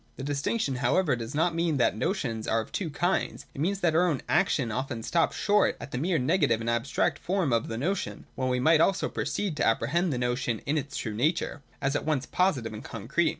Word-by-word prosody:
The 135 - -7
distinction 145 - -1
however 130 +4 +2
does 115 +3 -6
not 165 +3 +2
mean 165 -2 +1
that 120 - +2
notions 115 - -2
are 115 - +2
of 110 - -6
two 185 -5 -2
kinds. 175 +5 -1
It 135 - -5
means 195 +4 0
that 170 -2 +3
our 175 +3 +4
own 150 -7 -1
action 135 -10 +2
often 125 -1 -3
stops 165 +5 +1
short 210 0 +3
at - - -8
the 125 - -2
mere 170 +3 +1
negative 130 -3 +2
and 115 - -5
abstract 115 +3 0
form 180 -8 0
of 115 -1 +1
the 115 - -4
notion, 180 +10 -2
when 130 -1 -1
we 125 0 +1
might 160 +4 +5
also 190 -1 +2
have - - -21
proceeded 195 -7 -2
to - - +2
apprehend 155 +10 +1
the 130 - -1
notion 120 -1 -1
in 145 - 0
its 145 -2 -3
true 110 - -3
nature, 150 +6 0 0.2
as 140 +1 +1
at - - 0
once 150 -4 0
positive 135 - 0
and 110 - -7
concrete. 135 +9 0
145 Hz, 230 wpm, -28 LUFS, 120-170 Hz, 0.2 s, might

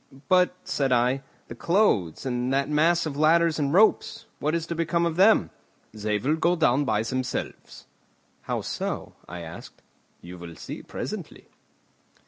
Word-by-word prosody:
"But," 180 -1 +4
said 135 -2 -1
I, 125 +2 +2 0.3
"the - - -8
clothes, 130 - +1
and 125 0 -1
that 135 +1 +1
mass 165 +3 +3
of 150 -3 -4
ladders 160 +2 +3
and 140 -2 0
ropes, 210 +6 +3
what 155 +2 0
is 165 -1 -2
to 170 - -4
become 170 +1 0
of 165 -1 -1
them?" 200 +5 +4 0.4
"They 105 -1 -1
will 145 +9 0
go 170 +2 +2
down 145 -4 +2
by 110 -3 +1
themselves." 130 +2 -5 0.6
"How - - -1
so?" - - -4 0.2
I 90 0 -7
asked. 85 0 -11 0.4
"You 90 +1 -11
will 85 -1 -9
see - - -8
presently." - - -7
145 Hz, 155 wpm, -25 LUFS, 120-170 Hz, 0.6 s, But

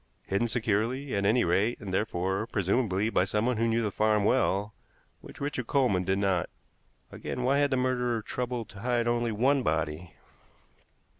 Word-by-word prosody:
Hidden 100 +5 0
securely, 115 +4 -1
at 100 0 +1
any 120 +4 +3
rate, 100 +7 +1
and 100 -4 -6
therefore, 95 +1 -1
presumably, 105 0 0
by 90 - +3
someone 105 +5 0
who 115 +1 +1
knew 115 0 +1
the 105 - -1
farm 105 0 +2
well, 105 -4 +1 0.5
which - - -13
Richard 140 -4 -3
Coleman 120 -10 +2
did 95 +1 +1
not. 95 -3 0 0.6
Again, 125 - -5
why 135 +3 +3
had 145 0 +3
the 130 - +1
murderer 125 -3 0
troubled 125 -2 -3
to 100 - -12
hide 120 +1 0
only 120 -1 +1
one 130 +6 +2
body? 80 - -2
110 Hz, 165 wpm, -28 LUFS, 100-125 Hz, 0.6 s, any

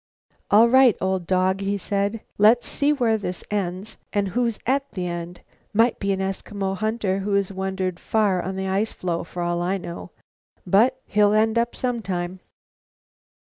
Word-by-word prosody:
"All 220 +3 +7
right, 260 -2 +5
old 190 -2 -1
dog," 185 +1 +1
he 200 +1 -1
said, 200 +3 -2 0.2
"let's 220 +4 +5
see 290 +1 +1
where 235 -6 +1
this 180 -3 -5
ends, 195 +1 -3
and 200 -2 0
who's 235 +1 0
at 275 +2 0
the 180 -2 -3
end. 175 0 -5 0.3
Might 230 +2 +3
be 200 0 0
an 190 - -1
Eskimo 195 0 -3
hunter 215 -2 -1
who 200 +1 -1
has 200 -1 +1
wandered 190 -1 -3
far 205 -5 +1
on 190 +2 -4
the 190 0 -3
ice 200 +4 0
floe, 170 -2 -3
for 175 +1 -5
all 175 0 -1
I 185 +3 0
know; 170 -1 -8 0.6
but 230 +8 +3
he'll 205 0 +3
end 220 +2 +3
up 235 +1 -1
sometime." 190 -7 -3
195 Hz, 170 wpm, -23 LUFS, 185-220 Hz, 0.6 s, All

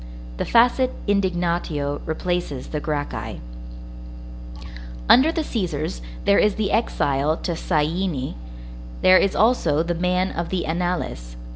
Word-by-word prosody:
The - - -2
facit 245 +2 +4 0.2
indignatio 175 -7 -1
replaces 160 -4 -3
the 150 - -3
Gracchi. 145 -1 -4 1.7
Under 270 +6 +6
the 330 -1 -1
Cæsars, 160 - -3 0.2
there 200 - +5
is 210 -1 +3
the 210 -2 -1
exile 155 - +1
to 175 - -3
Syene; 160 -3 -1 0.7
there 185 0 +7
is 195 - +1
also 170 -10 +2
the 175 +1 -1
man 180 +2 0
of 170 0 -4
the 185 -2 -2
Annales. 160 - -3
175 Hz, 120 wpm, -22 LUFS, 150-195 Hz, 1.7 s, there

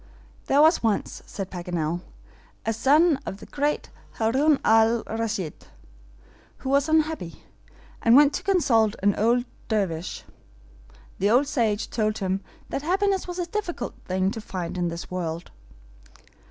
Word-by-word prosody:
"There 285 +2 +5
was 320 +3 +5
once," 220 -3 -1
said 195 -2 -6
Paganel, 175 -2 -3 0.6
"a 225 - +1
son 290 +6 +4
of 195 - -6
the - - -12
great 290 +1 -2 0.2
Haroun 270 +7 +2
al 225 +1 +4
Raschid, 220 -7 -4 0.9
who 265 - -5
was 280 +2 +2
unhappy, 315 - 0 0.6
and 230 +1 +5
went 290 +1 +7
to - - -2
consult 235 - +3
an 205 0 +4
old 240 +3 +2 0.2
Dervish. 185 -6 -2 1.0
The 200 - +2
old 250 +6 +4
sage 225 -6 0
told 215 -1 -1
him 190 -1 -1 0.3
that - - -3
happiness 385 +4 +1
was 355 0 -5
a 355 - -1
difficult 345 - -4
thing 185 +1 0
to 225 - -5
find 185 -4 -5
in 175 -1 0
this 170 +1 -6
world. 170 -2 -4
225 Hz, 140 wpm, -25 LUFS, 190-290 Hz, 1.0 s, went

